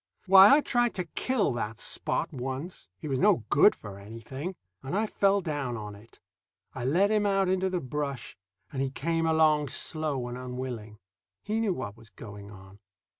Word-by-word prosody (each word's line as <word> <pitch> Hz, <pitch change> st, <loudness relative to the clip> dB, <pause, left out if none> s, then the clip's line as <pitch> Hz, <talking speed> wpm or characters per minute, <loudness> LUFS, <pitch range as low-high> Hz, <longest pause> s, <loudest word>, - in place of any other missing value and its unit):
Why, 195 Hz, +5 st, +9 dB
I 300 Hz, -, +3 dB
tried 240 Hz, -3 st, +1 dB
to 180 Hz, -, -1 dB
kill 220 Hz, -, 0 dB
that 115 Hz, -2 st, -4 dB
Spot -, -, -1 dB
once 135 Hz, +7 st, -5 dB
he 155 Hz, -, -7 dB
was 135 Hz, -3 st, -1 dB
no 195 Hz, -, +4 dB
good 180 Hz, +8 st, +6 dB
for 100 Hz, -2 st, -10 dB
anything; 115 Hz, -, -7 dB, 0.3 s
and 135 Hz, +9 st, -3 dB
I 220 Hz, -, +1 dB
fell 200 Hz, -1 st, +2 dB
down 145 Hz, -8 st, -3 dB
on 105 Hz, -1 st, -7 dB
it. 105 Hz, +3 st, -16 dB, 0.5 s
I 125 Hz, -, -5 dB
led 185 Hz, +10 st, +3 dB
him 210 Hz, -1 st, +2 dB
out 195 Hz, -1 st, +2 dB
into 190 Hz, +1 st, +1 dB
the 180 Hz, -2 st, -2 dB
brush, 140 Hz, -1 st, -4 dB, 0.4 s
and 135 Hz, -, -2 dB
he 135 Hz, -, 0 dB
came 165 Hz, +4 st, -1 dB
along 155 Hz, -2 st, +3 dB
slow 145 Hz, -2 st, -2 dB
and 125 Hz, +1 st, -6 dB
unwilling. 125 Hz, -4 st, -6 dB, 0.5 s
He 215 Hz, +2 st, -1 dB
knew 210 Hz, -5 st, 0 dB
what 105 Hz, -6 st, -6 dB
was 115 Hz, -1 st, -15 dB
going 105 Hz, 0 st, -11 dB
on. 95 Hz, -1 st, -14 dB
140 Hz, 180 wpm, -28 LUFS, 120-190 Hz, 0.5 s, Why